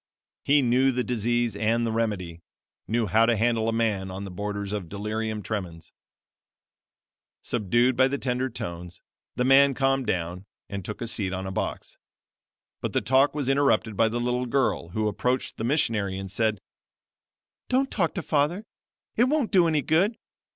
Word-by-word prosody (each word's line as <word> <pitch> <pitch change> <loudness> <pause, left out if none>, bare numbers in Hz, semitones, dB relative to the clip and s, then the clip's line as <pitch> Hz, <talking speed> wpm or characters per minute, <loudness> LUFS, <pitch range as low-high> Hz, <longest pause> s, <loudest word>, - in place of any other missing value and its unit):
He 145 0 +4
knew 130 +2 +3
the 125 0 -1
disease 120 -1 0
and 115 +3 +1
the 115 - -1
remedy 100 -7 -2 0.5
knew 115 +1 +1
how 110 +4 +3
to 120 - +3
handle 115 0 +1
a - - +1
man 110 -4 0
on 95 +2 -6
the 100 - -7
borders 100 +1 -4
of 95 -6 -4
delirium 105 +1 -3
tremens. 90 -7 -5 1.5
"Subdued 120 +3 +1
by 130 +1 +4
the 140 +1 -2
tender 130 0 -1
tones, 85 -5 -7 0.3
the 125 - 0
mad - - +2
man 140 +1 +6
calmed 135 -1 +1
down, 90 +2 -3 0.2
and 100 -1 -5
took 105 - -7
a 120 - -3
seat 100 -4 -1
on 95 0 -4
a 95 - -4
box. - - -4 0.8
But - - -3
the - - +1
talk 135 +3 +3
was 145 -4 -2
interrupted 135 -6 +2
by 115 - +3
the 115 +2 -2
little 125 +1 -1
girl, 130 -9 0
who 110 +4 -1
approached 125 +5 -1
the - - -4
missionary, 115 -8 +1
and 95 -1 -6
said: 110 -1 0 1.1
'Don't 265 +1 +1
talk 170 -6 0
to 180 - -3
father; 155 +9 0 0.5
it 240 - +4
won't 280 -3 0
do 180 -4 +5
any 155 -3 +1
good. 185 - +2
115 Hz, 175 wpm, -26 LUFS, 100-135 Hz, 1.5 s, man